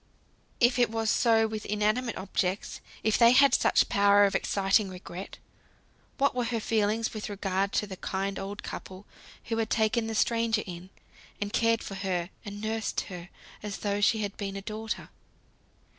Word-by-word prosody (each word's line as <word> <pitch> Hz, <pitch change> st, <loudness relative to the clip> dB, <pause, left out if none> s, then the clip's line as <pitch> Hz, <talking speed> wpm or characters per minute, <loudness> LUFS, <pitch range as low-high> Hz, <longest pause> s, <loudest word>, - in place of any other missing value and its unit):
If 245 Hz, +1 st, +4 dB
it 240 Hz, -3 st, +4 dB
was 225 Hz, -1 st, 0 dB
so 225 Hz, -2 st, +4 dB
with 220 Hz, -1 st, -4 dB
inanimate 215 Hz, +4 st, 0 dB
objects, 190 Hz, 0 st, -2 dB, 0.2 s
if 220 Hz, 0 st, +2 dB
they 235 Hz, 0 st, +7 dB
had 275 Hz, +1 st, +6 dB
such -, -, +4 dB
power 200 Hz, 0 st, +5 dB
of 195 Hz, -, 0 dB
exciting 195 Hz, +1 st, +2 dB
regret, 180 Hz, 0 st, -8 dB, 0.8 s
what 280 Hz, +1 st, +2 dB
were 250 Hz, -1 st, -1 dB
her 230 Hz, -1 st, -1 dB
feelings 220 Hz, +1 st, 0 dB
with 215 Hz, -1 st, -5 dB
regard 195 Hz, -1 st, -1 dB
to -, -, +1 dB
the 190 Hz, -2 st, -8 dB
kind 195 Hz, +1 st, -3 dB
old 200 Hz, +1 st, -6 dB
couple, 190 Hz, +2 st, -8 dB, 0.4 s
who 225 Hz, -, -3 dB
had 225 Hz, -1 st, -1 dB
taken 225 Hz, +1 st, +1 dB
the 225 Hz, -, -3 dB
stranger 230 Hz, -1 st, +1 dB
in, 180 Hz, 0 st, -8 dB, 0.5 s
and 205 Hz, 0 st, -3 dB
cared 230 Hz, 0 st, +2 dB
for -, -, -7 dB
her, 190 Hz, -2 st, -2 dB
and 205 Hz, 0 st, -7 dB
nursed 220 Hz, 0 st, -2 dB
her, 175 Hz, 0 st, -8 dB, 0.3 s
as 210 Hz, -1 st, -5 dB
though 205 Hz, 0 st, 0 dB
she 220 Hz, +1 st, +3 dB
had 200 Hz, 0 st, -4 dB
been 195 Hz, -1 st, -4 dB
a 195 Hz, -, -6 dB
daughter? 220 Hz, +2 st, -5 dB
210 Hz, 175 wpm, -28 LUFS, 195-225 Hz, 0.8 s, they